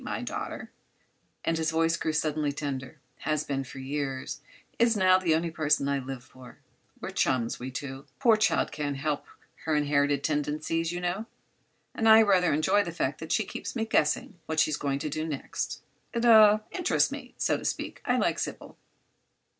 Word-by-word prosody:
My - - -4
daughter," - - -5 0.7
and 165 -1 +1
his 160 -1 +1
voice 165 +1 +2
grew 160 - -1
suddenly 150 -1 0
tender, 135 -3 -5 0.2
"has 155 -1 -1
been 135 -1 -2
for 135 - -11
years—is 140 - -2
now—the 185 -3 +4
only 165 +1 -1
person 150 -3 +1
I 140 0 +1
live 130 -1 -7
for. 125 0 -15 0.4
We're - - -5
chums, 120 -3 0
we 125 - -5
two. 135 +1 -6
The - - -34
poor 235 -5 +5
child 215 +1 +1
can't 145 -2 -3
help 145 +1 -2 0.4
her 160 -1 +1
inherited 145 -1 +2
tendencies, 155 +2 -1
you 175 0 -4
know, 185 +6 -2 0.7
and 225 -1 +2
I 220 0 +9
rather 185 -4 +3
enjoy 155 +7 +3
the 170 - -5
fact 170 - -2
that - - -7
she - - +2
keeps - - -6
me 225 -2 0
guessing 170 -1 0
what 160 0 -1
she's 155 -1 +3
going 140 -2 -1
to 140 - -4
do 155 +2 -3
next. 145 -4 -4 0.3
It—er—interests 220 - +4
me, - - -8
so - - +1
to - - -9
speak. - - -3
I - - +1
like - - +1
Sybil." - - -6
155 Hz, 175 wpm, -28 LUFS, 140-180 Hz, 0.7 s, I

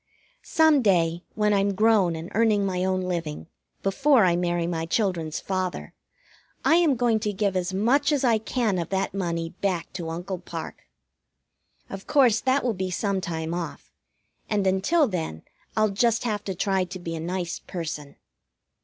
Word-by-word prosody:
Some 315 -3 +4
day, 170 -5 +2
when 210 -1 +2
I'm 200 0 +1
grown 210 -5 +3
and 160 +3 -7
earning 215 -2 +3
my 185 -1 -1
own 185 0 0
living, 170 -4 -3 0.4
before 255 +3 +4
I 175 -1 +3
marry 175 -1 0
my 165 -1 -2
children's 170 -5 -1
father, 185 -2 -3 0.7
I 325 - +5
am 325 -6 +3
going 235 -2 +2
to 210 0 -1
give 200 -1 -1
as 180 0 -1
much 255 +10 +2
as 285 -3 +1
I 230 -4 +3
can 220 -3 -1
of 170 - -4
that 195 0 -1
money 170 -4 -2
back 185 -4 -1
to 170 -3 -5
Uncle 180 +3 -4
Parke. 165 -2 -8 1.0
Of 195 0 -8
course 250 -7 +4
that 265 +1 +2
will 245 -2 +1
be 185 -1 -3
some 195 +1 -1
time 165 -2 -3
off, 175 -1 -6 0.6
and 205 -2 +1
until 195 - +3
then 160 - -4 0.3
I'll 215 0 +4
just 230 +3 +2
have 210 -4 -2
to 190 - -3
try 190 +1 +1
to 180 +1 -7
be 170 -2 -5
a - - -4
nice 175 +1 -3
person. 155 -5 -6
190 Hz, 170 wpm, -25 LUFS, 175-220 Hz, 1.0 s, I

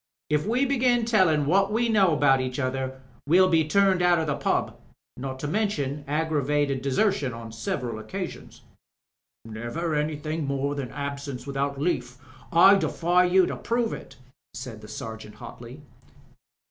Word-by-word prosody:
If 150 +4 +1
we 250 +5 +2
begin 250 -3 +2
tellin' 185 -10 +3
what 195 +6 +2
we 235 +2 +1
know 200 -6 +4
about 140 -3 +3
each 130 0 -4
other 130 -1 -3 0.3
we'll 185 +4 +5
be 160 -3 +3
turned 195 +1 +3
out 175 -1 +4
of 160 - 0
the 150 -2 -1
pub. - - -1 0.4
Not 130 +1 -5
to 150 - -2
mention 150 -7 -1
aggravated 145 -2 0
desertion 140 - +1
on 115 -1 -8
several 120 - -4
occasions 185 - -7 0.4
" - - -67
"Never 120 +10 -4
anything 150 0 -2
more 140 +1 -1
than 140 -4 -4
absence 140 -3 -5
without 140 0 -2
leaf— 125 -6 -2
^ - - -29 0.3
I 190 +4 +7
defy 180 -1 +2
you 180 +1 +4
to - - -3
prove 235 -1 -1
it," 130 - -9 0.4
said 120 -3 -7
the 105 - -11
Sergeant 110 0 -8
hotly. 120 +6 -11
150 Hz, 160 wpm, -26 LUFS, 130-185 Hz, 0.4 s, I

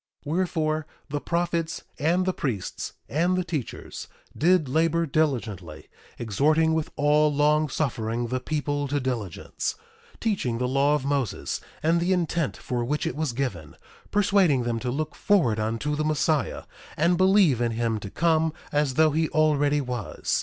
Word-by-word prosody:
1:11 145 - -4
Wherefore, 155 -3 0 0.2
the 145 +1 -2
prophets, 170 -1 -1 0.2
and 175 +5 +2
the 185 - +1
priests, 110 - -3
and 175 +5 +1
the 185 - +1
teachers, 155 -9 -5 0.3
did 175 -1 +3
labor 165 +4 +2
diligently, 115 - -2 0.3
exhorting 155 +9 +2
with 160 -1 -1
all 150 +1 +3
long 150 +1 +2
suffering 120 -4 -1
the 130 +1 -1
people 145 +1 -2
to 145 +1 0
diligence; 120 - -3 0.4
teaching 190 - -1
the 125 +1 0
law 140 +3 +3
of 145 - -3
Moses, 140 -4 -1 0.2
and 165 +2 +3
the 175 +2 +2
intent 170 -4 -1
for 120 -1 -3
which 150 +5 -1
it - - -2
was 155 -3 -1
given; 110 - -4 0.3
persuading 195 -10 +3
them 120 -1 -1
to 125 - -3
look 150 +4 -2
forward 150 - +2
unto 115 +7 -1
the 155 - -1
Messiah, 155 -1 0 0.3
and 170 +4 +3
believe 185 - +4
in 120 -1 +1
him 115 -1 -1
to 100 - -7
come 160 - +2 0.2
as 145 -3 +1
though 155 +1 +5
he 160 +1 +1
already 150 -2 +2
was. 125 -5 -2
150 Hz, 160 wpm, -26 LUFS, 125-160 Hz, 0.4 s, though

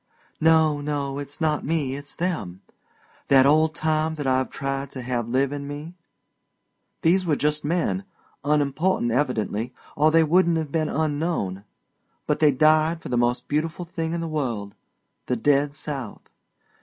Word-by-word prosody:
"No, 160 -2 +4
no, 145 -1 -2
it's 145 0 -7
not 155 -2 0
me, 145 -3 -1
it's 145 +1 -8
them 160 - -3 0.7
that 135 -1 +6
old 155 +3 +4
time 155 0 0
that 145 -2 -5
I've 130 0 +1
tried 135 0 -3
to 130 - -6
have 120 -2 -2
live 130 +2 +1
in 140 -1 -5
me. 145 +4 -7 1.1
These 185 +3 +4
were 155 - +3
just 150 +1 0
men, 175 +5 -1 0.4
unimportant 145 -1 +1
evidently 125 -2 -1 0.2
or 150 +2 +4
they 165 +1 +5
wouldn't 170 +1 +3
have 155 -3 -3
been 155 -1 0
'unknown'; 145 - -1 0.6
but - - 0
they 155 - +6
died 155 +4 +3
for - - -6
the 125 - 0
most 120 +1 +1
beautiful 165 +4 -2
thing 165 -1 -3
in 170 - -2
the 165 - -3
world 120 -10 -3 0.5
the 125 - +1
dead 140 +4 +2
South. 145 -4 -6
145 Hz, 155 wpm, -24 LUFS, 135-160 Hz, 1.1 s, that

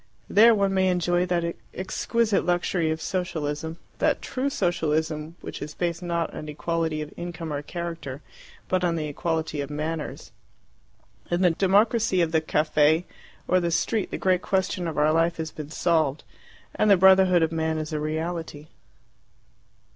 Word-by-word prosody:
There 225 +2 +6
one 200 -1 +1
may 190 0 +3
enjoy 175 0 +1
that 170 -1 -1 0.2
exquisite 215 +3 0
luxury 175 -1 0
of 160 0 -1
Socialism 160 -3 -3 0.2
that - - +2
true 270 +1 -2
Socialism 160 - -1
which - - -7
is 150 - -6
based 170 0 -2
not 170 -2 -2
on 155 - -7
equality 160 0 -2
of 150 - -11
income 170 -2 -5
or 145 - -2
character, 165 -4 -6 0.4
but 185 0 0
on 170 -2 +1
the 155 -2 -2
equality 160 0 -2
of 140 - -5
manners. 155 +1 -4 1.0
In 175 +2 +1
the 180 - +5
democracy 200 +3 +2
of 165 -2 +2
the 160 -1 +2
caffe 155 +1 +2 0.4
or 185 - +3
the 170 -1 0
street 205 +5 0
the - - -4
great 185 -1 +2
question 190 -2 -1
of 160 - -4
our 150 +1 +3
life 165 +1 +2
has 160 -1 -4
been 150 -1 -8
solved, 160 -3 +1 0.5
and 215 - +2
the 200 - +7
brotherhood 190 -2 +6
of 160 - +1
man 160 -1 -1
is 155 0 -4
a 155 - -1
reality. 160 0 -4
165 Hz, 160 wpm, -25 LUFS, 155-180 Hz, 1.0 s, the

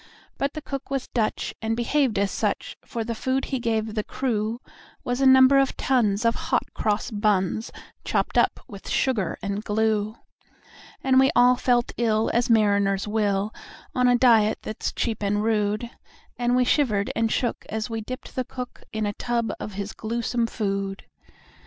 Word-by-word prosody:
But 275 +1 0
the 310 - -6
cook 275 -2 -6
was 275 -2 -3
Dutch, 225 -3 -1
and 225 0 -1
behaved 245 -2 +1
as 200 0 +1
such; - - -2
For 230 - -4
the 230 +1 -3
food 260 +4 -1
that - - -6
he 265 - -1
gave 225 -2 -1
the 215 -1 -1
crew 235 -3 -2 0.4
Was 245 +2 -2
a 270 - +5
number 265 +1 +7
of 270 -1 +1
tons 230 -5 +1
of 230 - +4
hot - - -2
cross 210 +3 -1
buns, 210 0 0 0.3
Chopped - - -1
up - - +2
with 200 -1 -10
sugar 230 -9 0
and 200 +1 -3
glue. 215 0 0 0.9
And 260 -1 +4
we 265 - +5
all 245 +1 +6
felt 245 -1 +1
ill 225 -2 +1
as 240 +1 +1
mariners 200 -3 +3
will, 210 -1 0 0.4
On 250 0 +3
a 245 0 +5
diet 225 -4 +4
that's 215 - -3
cheap 225 -3 -2
and 205 +1 0
rude; 215 0 0 0.5
And 245 0 +1
we 250 - +4
shivered 220 -8 +1
and 225 -1 +1
shook 240 - -1
as 220 0 -2
we 225 -1 -4
dipped 255 +4 -8
the 255 - 0
cook 250 0 -8
In 220 -1 -2
a 205 - -1
tub 235 +1 -1
of 210 - -6
his 200 +1 -5
gluesome 235 +1 -1
food. 195 -2 -3
225 Hz, 175 wpm, -25 LUFS, 210-245 Hz, 0.9 s, number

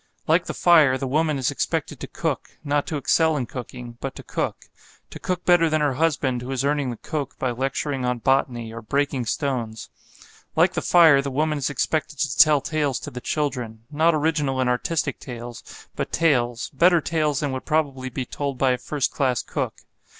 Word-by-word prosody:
Like - - +3
the - - -4
fire, 155 -7 +5
the 135 - -3
woman 155 +2 +1
is 130 -3 0
expected - - -2
to - - -6
cook: - - -4
not 145 -1 0
to 155 - -2
excel 160 +3 +2
in 130 - -1
cooking, 120 -1 -8
but 135 - -4
to - - -9
cook; - - -3 0.5
to - - -8
cook 180 -1 -3
better 175 -2 +5
than 155 0 +1
her 145 -2 +1
husband 135 -4 0
who 125 - -7
is 135 0 -1
earning 145 -2 +1
the 120 - -5
coke 145 +1 -5
by 130 - -1
lecturing 135 +2 -2
on 125 0 0
botany 120 -2 0
or 115 - -7
breaking 135 +1 -1
stones. 120 -5 -2 0.7
Like - - +4
the - - -1
fire, 160 -5 +6
the 140 - -4
woman 150 +2 0
is 135 - -1
expected 150 +1 -1
to 140 0 -1
tell 155 -3 +6
tales 145 -2 -1
to - - -7
the 125 - -7
children, 125 -8 -3
not 160 +2 +3
original 150 -3 0
and 130 - +1
artistic 140 +3 -1
tales, 120 -2 -8 0.3
but - - -3
tales 120 -7 +1
better 170 +5 +5
tales 155 -2 0
than 145 -2 -1
would 130 0 -5
probably 140 -4 0
be 130 +1 -4
told 140 +1 -4
by 130 0 +3
a 125 - -1
first 145 -3 -1
class 130 -5 0
cook. - - -4
140 Hz, 200 wpm, -23 LUFS, 125-155 Hz, 0.7 s, fire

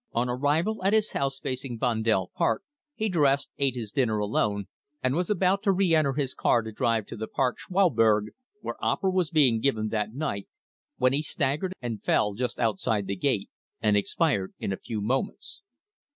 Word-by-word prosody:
"On 120 +2 +1
arrival 155 - 0
at 195 +2 +3
his 215 -1 +2
house 135 -1 -1
facing 130 -3 -4
Vondel 110 -6 +1
Park, 115 - 0 0.3
he 220 - -1
dressed, 145 -7 +2
ate 135 -2 +2
his 110 -4 -4
dinner 115 -5 +1
alone, 105 -1 0 0.4
and 130 0 +2
was 175 +3 0
about 195 -1 +2
to 200 -2 +3
re 190 -2 +2
enter 155 -4 +3
his 135 -2 -1
car 115 - +2
to 110 - -6
drive 110 0 0
to - - -8
the 110 +1 -5
Park 130 -2 0
Schouwburg, 115 - +3 0.3
where - - -6
opera 190 -1 +1
was 185 -4 +1
being 135 -8 +4
given 110 -4 0
that 105 -1 -1
night, 135 -10 -3 0.5
when 130 +1 +3
he 145 - +1
staggered 155 +4 -1
and 115 -3 -4
fell 105 - +2
just 125 +4 -3
outside 105 -2 0
the 100 - -2
gate, 105 0 -1 0.3
and 105 -2 +2
expired 100 - 0
in 100 - -2
a - - -4
few 110 -3 -5
moments. 130 - -2
130 Hz, 185 wpm, -27 LUFS, 110-155 Hz, 0.5 s, being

